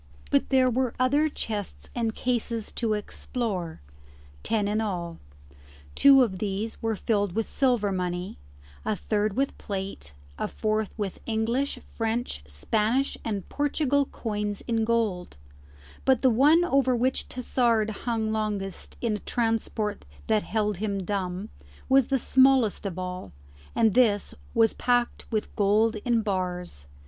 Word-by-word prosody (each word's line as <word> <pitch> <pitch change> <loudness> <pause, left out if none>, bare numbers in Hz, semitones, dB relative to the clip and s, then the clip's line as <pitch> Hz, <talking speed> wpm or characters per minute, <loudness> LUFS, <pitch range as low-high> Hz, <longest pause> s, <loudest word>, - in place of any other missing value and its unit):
But 140 - +2
there 260 -1 +4
were 250 0 0
other 285 +5 +3
chests 210 -8 -5
and 230 -2 -1
cases 235 -3 -2
to 225 -3 0
explore 205 - -4 0.6
ten 215 -3 0
in 210 +2 0
all: 175 -6 -3 0.7
two 275 -2 +7
of 190 -6 -2
these 210 +2 -3
were 225 -1 0
filled 205 -3 0
with 225 +2 -1
silver 245 -7 +1
money, 180 - -3 0.4
a 215 - 0
third 210 0 -1
with 275 +2 0
plate, 190 - -5 0.2
a - - 0
fourth 215 -1 -1
with 205 -4 -3
English, 230 +5 0 0.2
French, 225 - -2
Spanish, 215 - 0
and 205 -4 -3
Portugal 285 -1 +1
coins 210 -2 -3
in 225 -2 0
gold; 220 - -1 0.7
but 265 -1 +3
the 260 - +6
one 300 +9 +5
over 270 -6 +3
which 255 +2 0
Tassard 235 -3 +1
hung 220 0 -2
longest 210 -3 -3
in 225 -3 0
a - - -11
transport 225 -2 -1 0.2
that 215 -1 +2
held 210 -3 -1
him 200 -1 -2
dumb, 190 0 -3 0.4
was 265 -2 +5
the 270 - +2
smallest 260 -5 +4
of 185 -2 -6
all, 180 - -5 0.4
and 220 -3 +4
this 220 -5 +3 0.2
was 225 -1 +4
packed 245 0 0
with 215 -2 -2
gold 215 +2 +3
in 230 +1 +1
bars. 180 - -3
220 Hz, 140 wpm, -27 LUFS, 200-245 Hz, 0.7 s, two